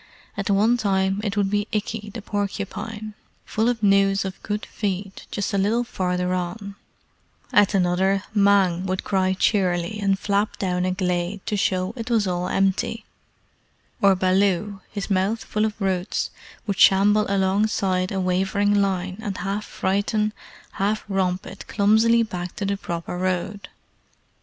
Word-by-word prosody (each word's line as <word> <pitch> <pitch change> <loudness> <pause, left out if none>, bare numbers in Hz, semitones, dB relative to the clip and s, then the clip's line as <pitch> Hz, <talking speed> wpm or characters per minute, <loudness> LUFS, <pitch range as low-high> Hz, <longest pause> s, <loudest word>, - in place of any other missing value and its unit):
At 200 0 -3
one 215 +5 +4
time 195 -2 +1
it 205 -1 -2
would 200 -1 +1
be 205 0 0
Ikki 210 0 -3
the 225 - -6
Porcupine, 205 +1 -4 0.3
full 220 +2 +1
of 230 -3 -2
news 195 -1 +3
of 190 0 -6
good 210 +1 -3
feed 195 -1 -4
just 200 - -3
a 200 - +2
little 220 +5 +2
farther 180 -5 -1
on; 185 +3 -4 0.8
at 205 0 +4
another 190 +2 +2
Mang 195 -3 +3
would 185 0 -2
cry 190 -1 +1
cheerily 185 -1 +1
and 195 -1 +2
flap 200 +1 0
down 180 -2 -1
a 185 - +1
glade 180 +1 -2
to 210 - -1
show 185 0 0
it 230 -1 -6
was 225 -3 +2
all 180 -1 -1
empty; 195 +3 0 1.0
or 195 -1 +5
Baloo, 195 +1 +1
his 200 0 -4
mouth 195 +4 +1
full 215 0 0
of 215 0 -4
roots, 190 -2 -1 0.3
would 200 -3 -2
shamble 205 +2 +5
alongside 190 -1 +1
a 195 - -1
wavering 190 +2 +1
line 190 0 -1
and 200 -3 -4
half 200 +3 -3
frighten, 205 +2 0 0.4
half 205 +2 -1
romp 190 -2 0
it - - -10
clumsily 220 +3 +4
back 180 -5 -5
to 200 - -3
the 200 0 0
proper 175 -2 -5
road. 185 +2 -2
195 Hz, 150 wpm, -23 LUFS, 185-210 Hz, 1.0 s, or